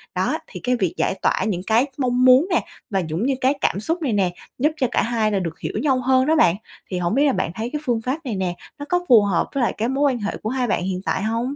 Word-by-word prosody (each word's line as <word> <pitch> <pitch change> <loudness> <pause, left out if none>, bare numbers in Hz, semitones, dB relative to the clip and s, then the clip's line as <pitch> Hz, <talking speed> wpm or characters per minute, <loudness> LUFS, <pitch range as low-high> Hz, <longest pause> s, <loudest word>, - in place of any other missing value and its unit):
Đó. - - 0
Thì - - -9
cái 250 0 +1
việc 190 -8 -1
giải - - 0
tỏa - - +1
những 185 -5 -1
cái 230 +4 +4
mong 250 -2 +1
muốn 255 +6 +6
nè, 355 - +1 0.2
và 195 -4 0
cũng 165 +8 -2
như 275 - +2
cái 260 +2 +3
cảm 195 - +1
xúc 330 - -2
này 270 -7 0
nè, 190 -4 +1 0.3
giúp 300 +5 +3
cho 260 -4 +1
cả - - +2
hai 225 -2 0
là 200 - +1
được 165 -3 -5
hiểu - - -4
nhau 265 -3 +2
hơn 260 +1 +3
đó 315 +3 +3
bạn. 180 - +4 0.3
Thì 185 - -3
hổng 175 +4 0
biết 285 +2 +4
là 280 - +3
bạn 165 - -1
thấy 225 +3 -3
cái 300 - -2
phương 235 -3 0
pháp 255 +5 -2
này 235 -5 -2
nè, 185 -2 -2 0.2
nó 290 - -5
có 355 0 0
phù 235 -4 +8
hợp 195 -4 0
với 275 - 0
lại - - +1
cái 225 +2 0
mối 275 +1 +2
quan 245 - -3
hệ 205 -1 -3
của 215 - -4
hai 255 -1 -1
bạn 200 - 0
hiện 185 0 -3
tại 190 - -1
hông? 230 +5 -1
240 Hz, 295 wpm, -22 LUFS, 200-265 Hz, 0.3 s, phù